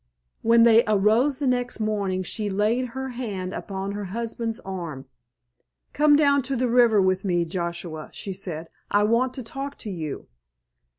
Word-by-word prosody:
When 230 +1 +5
they 230 0 +7
arose 215 +7 +3
the 290 - -2
next 245 -2 0
morning 200 -4 -1
she 210 +3 -2
laid 215 +6 +1
her 265 0 -3
hand 205 -7 -4
upon 195 0 -4
her 205 0 -4
husband's 230 +3 -4
arm. 170 -8 -6 0.9
"Come 295 0 +5
down 280 -1 +4
to 270 +1 -2
the 250 0 +1
river 235 -3 +5
with 185 0 +2
me, 175 -3 +1
Joshua," 170 -2 -5
she 195 - -6
said. 170 -4 -7 0.2
"I 205 0 +3
want 235 +4 +2
to 260 - -5
talk 275 +5 -6
to 210 - -6
you." 160 -5 -5
215 Hz, 165 wpm, -25 LUFS, 185-245 Hz, 0.9 s, they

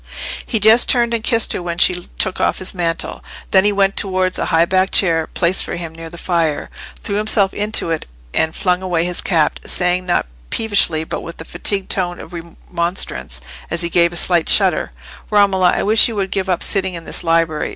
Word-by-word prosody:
He 225 - -1
just 220 +3 +5
turned 235 -2 +3
and 230 -1 -2
kissed 230 -2 +1
her - - -4
when 170 -1 -5
she 180 0 +1
took 190 - -1
off - - +1
his 185 - -1
mantle; 170 -3 -3 0.3
then 190 0 +4
he 205 - +3
went 195 -1 +1
towards 185 -1 0
a - - -1
high 165 0 +2
backed 185 +2 0
chair 165 -4 +2
placed 180 +2 +3
for - - -5
him 170 -2 -7
near 165 0 -9
the 170 - -11
fire, 165 -4 -2 0.3
threw 200 - -2
himself 210 -2 +3
into 210 -5 0
it, 160 - -3 0.3
and 160 0 0
flung 180 -1 0
away 175 -3 -1
his 180 0 -1
cap, 160 -5 0
saying, 180 0 0
not 175 - +1 0.2
peevishly, 200 -8 +1
but - - -5
in 170 - -8
a 160 - -9
fatigued 195 +3 -2
tone 175 -2 -2
of - - -11
remonstrance, 170 - -4 0.3
as 170 - +1
he 170 - 0
gave 170 0 +3
a 175 - -7
slight 175 -2 +1
shudder— - - +2 0.4
"Romola, 195 -3 +3
I - - -1
wish 215 +2 +5
you 230 - -5
would 195 -2 -2
give 190 -1 -2
up 180 -2 0
sitting 190 -2 +2
in 165 -1 -9
this - - -2
library. 165 -2 0
180 Hz, 210 wpm, -17 LUFS, 170-195 Hz, 0.4 s, just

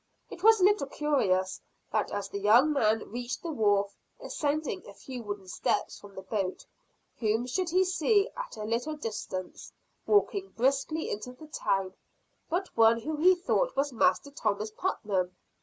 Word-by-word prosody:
It 345 - -9
was 440 +1 +6
a - - +2
little 395 -7 +4
curious 200 -12 0 0.3
that 215 0 0
as 205 -1 -3
the 200 - -5
young 235 +9 +5
man 220 -6 +1
reached 245 +2 -4
the 335 - -3
wharf, 205 -6 +2 0.2
ascending 290 -8 -2
a 200 - -11
few 255 +1 -8
wooden 205 -3 -6
steps - - -1
from 200 -1 -14
the 190 - -7
boat, 190 -1 -3 0.5
whom 225 +1 +1
should 350 +8 -1
he 365 +3 +4
see 395 +3 +2
at - - -6
a 215 - -5
little 235 +8 -1
distance, 215 -8 -6 0.4
walking 405 -2 +2
briskly 275 +6 +1
into 230 +5 -5
the 280 +5 -13
town, 195 -10 -1 0.6
but 365 +3 -2
one 230 +1 +5
who 310 +5 -3
he 365 +4 +6
thought - - 0
was 280 0 0
Master 225 +5 +2
Thomas 215 -5 -2
Putnam. 195 - -2
245 Hz, 165 wpm, -29 LUFS, 205-315 Hz, 0.6 s, was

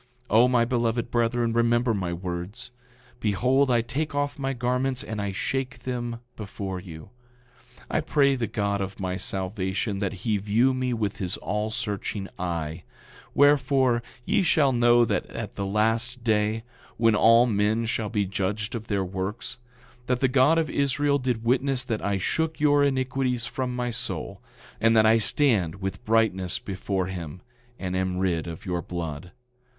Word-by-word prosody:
9:44 - - +2
O, 120 +3 +7
my 125 -2 +3
beloved 120 -1 0
brethren, 120 0 +1
remember 120 0 +2
my 95 -4 -2
words. 90 +7 -5 0.5
Behold, 125 +6 +2
I 120 -2 +3
take 145 +6 -3
off 145 0 -1
my 135 0 -1
garments, 125 +1 0
and 110 -5 -4
I 100 -1 -2
shake 130 +7 -3
them 120 -2 -4
before 100 -3 -5
you; 80 -4 -11 0.8
I - - 0
pray 140 -2 +3
the 120 -3 -2
God 100 -2 -1
of 95 +1 -5
my 90 -1 -2
salvation 95 +2 -2
that 100 -1 -4
he 110 -3 +2
view 110 +6 +2
me 130 -1 -1
with 110 -3 -2
his 95 -4 -2
all 105 +2 -2
searching 105 -3 -3
eye; 85 -2 -3 0.5
wherefore, 135 -4 +4 0.2
ye - - +2
shall 150 -6 +3
know 120 -1 +5
at 115 - -3
the 100 - -3
last 115 +4 0
day, 110 0 +1 0.3
when 115 -1 +4
all 115 +3 +6
men 110 0 +1
shall 110 -1 -2
be 105 -2 0
judged 100 +2 -2
of 115 -1 -5
their 100 -3 0
works, 95 +6 -4 0.5
that 125 -1 +1
the 130 - +3
God 135 +5 +4
of 165 -1 +2
Israel 140 +1 +1
did 125 -3 -1
witness 130 +2 +2
that 115 -4 -3
I 100 -1 0
shook 160 - -1
your 145 -1 +4
iniquities 130 -3 0
from 125 +1 -3
my 125 -1 -1
soul, 115 - -4 0.4
and 115 0 +4
that 110 - +6
I 110 +1 +5
stand 105 - +2
with 95 +4 -5
brightness 110 -5 +2
before 95 -1 -3
him, 90 -2 -7 0.3
and 95 -1 -3
am 95 0 -1
rid 90 -3 0
of 80 -1 -8
your 90 -1 -1
blood. 85 -1 -5
115 Hz, 165 wpm, -26 LUFS, 95-125 Hz, 0.8 s, O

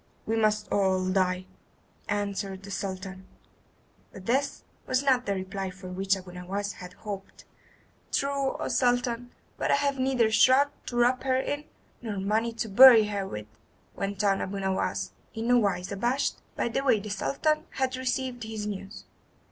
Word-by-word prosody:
"We 225 - 0
must 215 -1 +2
all 190 -2 +2
die," 185 -1 +1 0.6
answered 200 -2 -2
the 200 - -9
Sultan; 190 -1 -5 0.8
but 190 - -11
this 270 +5 0 0.2
was 255 +1 +1
not 255 -4 +2
the 200 - +1
reply 190 0 -4
for 185 0 -10
which 195 +2 0
Abu 185 -1 -10
Nowas 195 +3 -4
had 180 0 -10
hoped. 200 -1 -8 0.7
"True, 275 -1 0
O - - -3
Sultan, 245 -1 +1 0.3
but - - 0
I - - +5
have 280 -1 0
neither 255 -4 +2
shroud 260 +6 +5 0.2
to 245 - -5
wrap 245 +1 +3
her 260 -1 +1
in, 290 +2 -3 0.4
nor 220 -4 -4
money 215 +4 0
to 225 0 -3
bury 225 0 +9
her 200 -2 -2
with," 105 - -6 0.5
went 200 0 -3
on 195 -1 +2
Abu 195 +1 -3
Nowas, 190 -1 -1 0.2
in 225 +1 -3
no 245 0 +6
wise 195 -4 0
abashed 240 +8 0
by - - 0
the 235 +4 -1
way 255 -6 +4
the 210 +1 -6
Sultan 305 +9 0
had 260 -1 -1
received 255 -1 -2
his 220 -1 -5
news. 200 0 -6
210 Hz, 165 wpm, -28 LUFS, 195-250 Hz, 0.8 s, bury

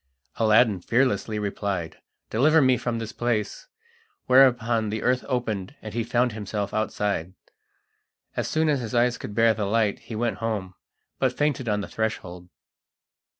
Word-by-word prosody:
Aladdin 110 -2 +4
fearlessly 115 -2 +1
replied: 100 -4 -3 0.3
"Deliver 155 +8 +4
me 130 -3 +4
from 120 -1 -2
this 115 -1 -5
place!" 120 - -2 0.6
whereupon 120 -4 +4
the 110 +1 -3
earth 125 0 +2
opened, 120 -2 -2
and 110 -1 -8
he 115 0 -1
found 120 +1 +1
himself 105 -1 -4
outside. 100 -4 -2 1.0
As - - -1
soon 160 0 +1
as 145 -3 +2
his 120 0 -5
eyes 120 +1 +2
could 105 - -7
bear 115 0 +5
the 105 -1 -2
light 105 0 +1
he 115 - -9
went 115 -2 -1
home, 105 -5 -3 0.5
but 130 -2 0
fainted 145 -5 0
on 105 0 0
the - - -6
threshold. 90 -5 -4
115 Hz, 150 wpm, -25 LUFS, 105-125 Hz, 1.0 s, bear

